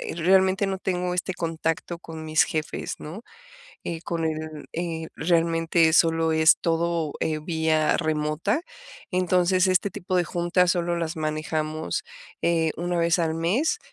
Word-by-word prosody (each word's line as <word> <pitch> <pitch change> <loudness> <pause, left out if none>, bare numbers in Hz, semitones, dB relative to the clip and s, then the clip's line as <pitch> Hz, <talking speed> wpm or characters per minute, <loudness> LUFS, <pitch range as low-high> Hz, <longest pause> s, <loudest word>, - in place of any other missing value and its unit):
realmente 190 +3 +3
no 190 0 -2
tengo 180 -1 -2
este 185 +1 -2
contacto 165 0 -3
con 160 -2 -9
mis 155 0 +4
jefes, 155 -4 -3
¿no?, 175 +9 -8 0.6
eh, 165 -1 -4
con 170 -1 -2
él, 155 -1 -4
eh, 165 -1 -3
realmente 165 -1 +2
solo 165 0 +3
es 160 0 +6
todo, 165 -2 0
eh, 155 -1 0
vía 160 -1 +1
remota, 155 - 0 0.5
entonces, 185 0 +2
este 185 +2 +2
tipo 185 +1 -3
de 175 - +3
juntas 175 +2 +2
solo 175 -1 -1
las 165 0 -3
manejamos, 155 - -2 0.4
eh, 165 -2 +2
una 175 +1 -2
vez 170 +1 +2
al 160 -1 0
mes, 190 - +1
165 Hz, 140 wpm, -25 LUFS, 160-180 Hz, 0.6 s, es